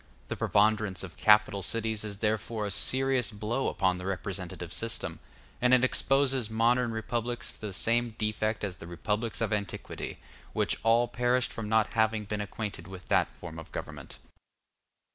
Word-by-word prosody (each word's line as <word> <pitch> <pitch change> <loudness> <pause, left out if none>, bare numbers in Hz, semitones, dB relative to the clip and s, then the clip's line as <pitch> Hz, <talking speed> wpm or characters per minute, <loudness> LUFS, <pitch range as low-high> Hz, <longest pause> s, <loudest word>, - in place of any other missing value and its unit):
The - - -1
preponderance 105 -3 +2
of - - -8
capital 105 -2 +5
cities 110 +2 -1
is 105 -2 -5
therefore 110 0 -1
a 100 - -3
serious 130 +7 +2
blow 110 +4 -2
upon 95 -1 +1
the 90 - -6
representative 90 -3 -4
system, 115 0 -4 0.4
and 125 +1 +6
it 125 - +2
exposes 135 -2 +3
modern 120 +2 +2
republics 120 +2 -3
to - - -15
the - - -5
same 115 +3 +1
defect 110 0 -1
as 95 -3 -3
the 85 - -9
republics 105 +7 -2
of 110 -2 +1
antiquity, 100 -2 -4 0.4
which - - 0
all 115 +1 +4
perished 125 +1 +1
from 110 -2 -5
not 110 0 +2
having 110 -1 +2
been 105 +1 -3
acquainted 105 0 -5
with 95 -1 -10
that - - +3
form 80 -2 -9
of 80 - -11
government. - - -7
110 Hz, 160 wpm, -29 LUFS, 100-115 Hz, 0.4 s, and